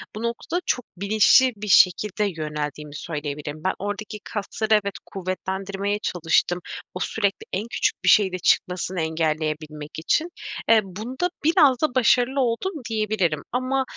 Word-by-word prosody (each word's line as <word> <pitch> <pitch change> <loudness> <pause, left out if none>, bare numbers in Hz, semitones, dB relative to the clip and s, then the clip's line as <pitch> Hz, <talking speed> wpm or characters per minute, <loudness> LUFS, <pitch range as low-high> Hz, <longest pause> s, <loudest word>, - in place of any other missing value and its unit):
bu 215 - -5
noktada 235 +9 -2
çok 250 - 0
bilinçli 215 +6 +5
bir 210 +1 -7
şekilde 195 +2 +4 0.2
yöneldiğimi 150 -1 -4
söyleyebilirim. 150 -1 -5
Ben 190 - +2
oradaki 205 +2 -5
kasları 215 +1 -2
evet, 200 -2 +2
kuvvetlendirmeye 195 +2 -3
çalıştım. 175 -1 +1 0.3
O 180 - -5
sürekli 200 +1 -1
en 205 +5 -2
küçük - - 0
bir - - +4
şeyde 190 -4 +5
çıkmasını 180 0 +1
engelleyebilmek 155 -1 -2
için. 310 - +1 0.4
Eee, 225 -1 +7
bunda 225 - -3
biraz 295 -6 +4
da 305 -5 0
başarılı 255 +2 +3
oldum 250 +11 0 0.2
diyebilirim. 215 -8 0
Ama, 255 +2 0
200 Hz, 135 wpm, -24 LUFS, 165-230 Hz, 0.4 s, Eee